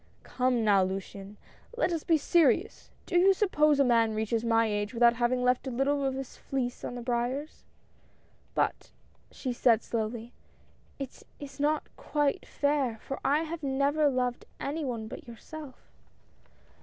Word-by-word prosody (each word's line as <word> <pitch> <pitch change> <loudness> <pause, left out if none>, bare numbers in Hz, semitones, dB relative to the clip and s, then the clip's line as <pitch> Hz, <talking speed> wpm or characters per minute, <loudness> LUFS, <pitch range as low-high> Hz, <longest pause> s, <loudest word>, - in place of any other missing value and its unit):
"Come 250 -2 0
now, 200 -3 +5
Luciane, 195 +2 -5 0.4
let 370 - +1
us 325 - -2
be 330 - +3
serious. 330 +1 +2 0.2
Do 350 - +2
you 385 +2 +5
suppose 305 -7 +3
a - - +6
man 230 -3 +3
reaches 220 +1 -1
my 230 -1 +3
age 205 +2 -2
without 235 0 +5
having 250 +1 +1
left 250 +1 +2
a - - -1
little 275 +3 0
of 265 -1 0
his 270 -1 -7
fleece 255 -2 -3
on - - -4
the 245 - -6
briars? 250 +5 -2
" - - -36
i - - -34 0.9
"But," - - 0 0.4
she 255 -3 -4
said, 235 -2 +3
slowly, 230 +1 -3 0.6
"it 275 -2 -7 0.2
is 285 -1 -10
not 300 +2 +1
quite 295 -2 -1
fair, 285 -5 0
for 270 - -6
I 290 +4 +2
have 330 +1 -5
never 285 +2 +2
loved 250 -2 -1
any 300 +3 -3
one 235 -5 -3
but 300 +5 -9
yourself." 270 +4 -9
255 Hz, 165 wpm, -29 LUFS, 235-290 Hz, 0.9 s, a